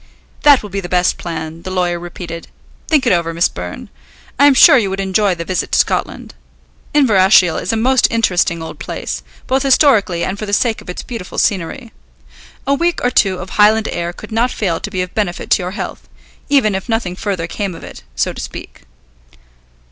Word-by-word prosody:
"That 285 -5 +6
will 210 - -9
be 200 - -2
the 175 - -7
best 180 0 +1
plan," 165 -1 -6
the 185 - -7
lawyer 180 -2 -1
repeated. 170 -1 -8 0.4
"Think 300 -5 +2
it 230 - +4
over, 165 -1 -1
Miss 170 - +3
Byrne. 90 0 -8 0.5
I 285 - +7
am 280 - +5
sure - - +8
you 215 -6 +2
would 190 +1 -4
enjoy 195 0 +1
the 170 0 -6
visit 185 0 -2
to - - +4
Scotland. - - -1 0.6
Inverashiel 195 - +4
is - - -2
a 225 - 0
most 255 +3 +3
interesting 180 -7 +1
old 160 - -9
place, - - -5 0.2
both 265 +1 +1
historically 250 - +3
and 195 +2 -3
for 215 - -5
the 205 - -4
sake 225 +1 +1
of - - -14
its 180 - -5
beautiful 230 -7 -8
scenery. 210 +6 -1 0.7
A 275 - +2
week 340 +4 0
or 245 - +2
two 195 -6 +2
of 180 +1 -8
Highland 215 +1 +4
air 170 0 -3
could 175 - -12
not 230 +3 +1
fail 180 -9 -2
to - - -5
be 185 -3 -2
of 180 - -9
benefit 200 -5 -3
to - - +4
your 180 0 -4
health, - - -6 0.4
even 265 -8 +3
if 190 +4 -4
nothing 225 -6 -1
further 190 -3 -3
came 190 +1 -4
of - - -11
it, - - -10
so - - 0
to - - -7
speak." - - -9
195 Hz, 205 wpm, -16 LUFS, 175-230 Hz, 0.7 s, sure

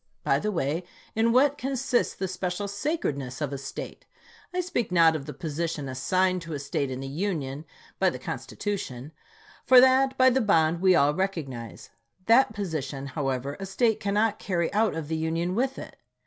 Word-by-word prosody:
By - - +2
the 210 - -1
way, 165 -1 -1 0.3
in 225 +1 +2
what 280 +4 +3
consists 265 -1 0
the 190 - -3
chap.xix. 185 - -4
special 180 +2 -3
sacredness 150 - -3
of 145 -2 -2
a - - -3
State? 135 - -8 0.4
I 365 - -2
speak 245 - -2
not 165 -2 +5
of 145 -2 -5
the 150 - -5
position 160 -2 -3
assigned 185 +8 +1
to 165 -1 -7
a 145 - -3
State 140 0 -2
in 130 0 -5
the 135 - -5
Union, 150 -3 -3 0.3
by - - +4
the - - -5
Constitution; 150 - -5 0.5
for 255 -1 +8
that, 260 +1 +4
by 260 0 +6
the 260 +2 +2
bond, 165 -5 +2
we 185 -1 +5
all 145 -2 +4
recognize. 150 -11 -4 0.3
That 235 +1 +5
position, 155 -10 -4
however, 135 -1 -2
a 195 - -5
State 220 +3 +1
cannot 205 +1 +1
carry 175 -3 -1
out 215 -2 +2
of 160 -2 -4
the 160 +1 -2
Union 165 +3 -1
with 260 +5 0
it. - - -9
180 Hz, 185 wpm, -27 LUFS, 145-215 Hz, 0.5 s, for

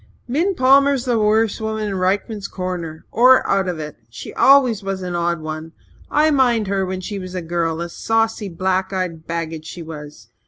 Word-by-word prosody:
"Min 335 +10 0
Palmer's 275 0 +4
the 240 -3 +1
worst 215 0 +2
woman 220 -1 -2
in 200 - -3
Rykman's 195 +2 -1
Corner 175 -4 -5
or 255 +3 +5
out 195 -1 +1
of 180 -2 -2
it. 150 -1 -7
She 120 +1 -9
always 260 -6 +5
was 195 -1 -4
an 180 -1 -4
odd 170 -1 -1
one. 155 +1 -6 0.4
I 310 +1 +3
mind 245 -6 +3
her 195 0 0
when 185 0 -4
she 200 +2 -5
was 185 0 -7
a 180 - -2
girl 165 -1 -1
a 170 - -3
saucy, 225 +3 -1
black 185 +2 -1
eyed 180 -4 -4
baggage 165 -2 -4
she 170 - -7
was! 150 -7 -10
190 Hz, 190 wpm, -20 LUFS, 170-225 Hz, 0.4 s, or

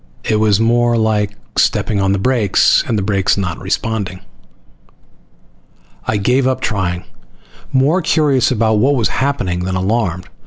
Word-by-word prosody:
It 110 - 0
was 105 -1 +2
more 120 +1 +2
like 105 -2 0 0.2
stepping 100 -2 +1
on 95 0 +1
the 100 - +1
brakes 110 -2 +2
and 110 - 0
the 100 - -1
brakes 100 -1 +1
not 95 -4 -3
responding. 100 -5 -3 1.9
I 110 - 0
gave 125 +6 +1
up 130 - 0
trying, 90 -5 -2 0.7
more 140 +8 +2
curious 150 -6 +2
about 110 -3 +1
what 140 +6 +3
was 115 -5 +1
happening 130 -10 -1
than 95 +1 -3
alarmed. 95 -2 -1
110 Hz, 145 wpm, -16 LUFS, 95-125 Hz, 1.9 s, what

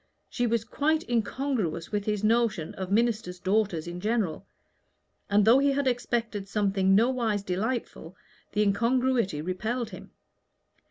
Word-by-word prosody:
She 245 -1 0
was 230 -1 0
quite 310 +7 0
incongruous 230 - -1
with 205 -1 -1
his 210 -1 -1
notion 220 -7 +1
of 190 0 -6
ministers' 215 -4 +1
daughters 190 -3 0
in 175 +1 -6
general; 200 -4 -1 0.8
and 205 0 +4
though 235 +4 +6
he 280 0 +3
had 280 0 0
expected 235 -5 -1
something 195 -2 +2
nowise 225 -2 +1
delightful, 200 -2 -3 0.4
the 210 +1 +2
incongruity 230 - +1
repelled 220 +7 -3
him. - - -10
215 Hz, 130 wpm, -27 LUFS, 195-240 Hz, 0.8 s, though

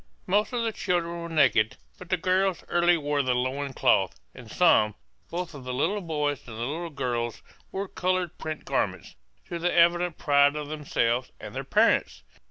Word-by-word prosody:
Most 205 +3 +1
of 245 -2 -1
the 225 - 0
children 170 -4 -2
were 170 - -6
naked, 130 -9 +3 0.2
but 180 - -11
the 185 - +2
girls 185 +1 +1
early 175 0 +3
wore 145 -2 0
the 130 -2 +1
loin 135 +3 -2
cloth; 95 - +2
and - - -12
some, 105 -1 +4 0.3
both 175 -1 -4
of 140 -3 -9
the 125 0 -4
little 185 +10 0
boys 150 -5 -1
and 110 -2 -8
the - - -5
little 160 +8 -3
girls, 120 -5 -3 0.3
wore 195 +1 -3
colored 185 -2 -1
print 155 -1 -5
garments, - - -2 0.3
to 170 - -5
the 175 +1 +1
evident 175 0 +3
pride 145 0 +4
of 150 -1 -5
themselves 130 -5 -1
and - - -9
their - - -4
parents. 65 +1 +2
155 Hz, 180 wpm, -27 LUFS, 130-175 Hz, 0.3 s, some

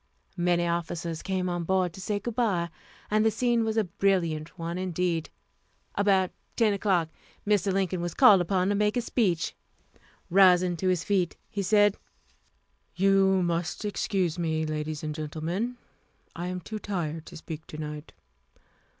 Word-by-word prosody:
Many 175 0 +2
officers 170 -1 -2
came 185 -1 -1
on 175 -1 -2
board 185 0 +1
to 190 - -9
say 205 +2 -1
good 235 +3 -4
by, 195 -8 0 0.4
and 215 0 +3
the 220 - +5
scene 235 0 +1
was 220 0 -1
a 220 - +4
brilliant 170 -4 0
one 170 +1 -4
indeed. 180 -2 -1 0.6
About 195 -2 +2 0.2
10 220 -3 +3
o'clock 190 -5 +1 0.4
Mr. 205 -2 +2
Lincoln 185 -2 0
was 175 -1 -3
called 210 -8 +7
upon 185 +1 +1
to - - +2
make 210 +2 +1
a - - +2
speech. 195 -9 0 0.8
Rising 180 -1 +5
to 185 - -1
his 180 -2 +1
feet, 190 -4 0
he 200 - -2
said: 205 +1 +4 1.0
"You 195 0 +4
must 175 +4 -2
excuse 185 -4 -1
me, 160 -2 0
ladies 155 0 -3
and 150 0 -3
gentlemen. 165 +10 -3 0.6
I 175 +1 -4
am 180 0 -4
too 215 +5 -6
tired 165 -6 -4
to - - -9
speak 160 0 -8
to 155 - -8
night. 150 0 -6
180 Hz, 160 wpm, -27 LUFS, 170-200 Hz, 1.0 s, called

